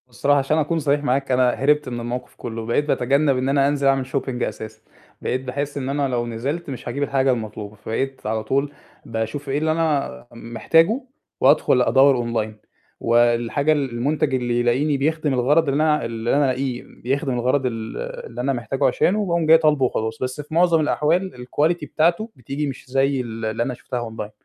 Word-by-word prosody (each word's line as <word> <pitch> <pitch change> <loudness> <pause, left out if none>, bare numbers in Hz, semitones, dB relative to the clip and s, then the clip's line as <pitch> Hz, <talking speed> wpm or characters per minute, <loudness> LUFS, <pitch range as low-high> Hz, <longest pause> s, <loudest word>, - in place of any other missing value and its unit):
هو - - -41
الصراحة 140 +4 +2
عشان 140 +3 0
أكون 160 +2 0
صريح 145 -1 +1
معاك، 135 0 0
أنا 125 0 +4
هربت 145 +2 +1
من 120 -1 -4
الموقف 120 +2 -5
كُلّه، 115 -2 -6
بقيت 120 +6 +1
باتجنَّب 140 0 +2
إن 130 +1 -1
أنا 140 0 +3
أنزِل 140 -1 +1
أعمل 135 -1 +2
shopping 130 -2 -2
أساسًا، 110 0 -6 0.4
بقيت 130 - -1
باحس 140 +3 -4
إن 135 -1 -3
أنا 140 0 0
لو 120 -2 -1
نزِلت 140 +9 -4
مش 130 -3 -7
هاجيب 140 +4 -2
الحاجة 135 -1 +2
المطلوبة، 110 -3 -5
فبقيت 130 +5 -4
على 110 0 -1
طول 140 +4 0 0.3
باشوف 115 +6 -4
إيه 135 - 0
اللي 155 +1 +1
أنا 155 -6 -1
محتاجُه 165 - +1 0.4
وادخل 135 -2 +4
أدوَّر 135 +2 +5 0.3
online 110 - -11 0.5
والحاجة 120 +5 +2
ال 145 -3 +1
المنتج 140 +4 0
اللي 120 -2 0
يلاقيني 135 +5 +1
بيخدم 155 +1 0
الغرض 140 +5 +3
اللي 145 +3 +2
أنا 150 -4 +2
اللي 115 0 -2
أنا 145 0 +3
ألاقيه 130 -1 -2
بيخدم 135 +1 -3
الغرض 130 +3 +1
ال 115 -2 -4 0.3
اللي 120 +1 -6
أنا 135 +2 0
محتاجُه 130 +3 -2
عشانه 210 +3 +1
باقوم 170 -3 0
جاي 160 +1 +8
طالبُه 150 -4 +3
وخلاص، 110 -2 -2
بس 130 +3 -3
في 150 +2 -12
مُعظَم 170 0 +4
الأحوال 155 -2 0
الquality 155 +5 0
بتاعته 170 +8 +2
بتيجي 140 +4 -4
مش 135 -2 -7
زي 135 0 +1
ال 115 -2 -6
اللي 110 +2 -1
أنا 125 - -3
شُفتها 120 -1 -5
online، 105 -1 -7
135 Hz, 190 wpm, -22 LUFS, 120-145 Hz, 0.5 s, جاي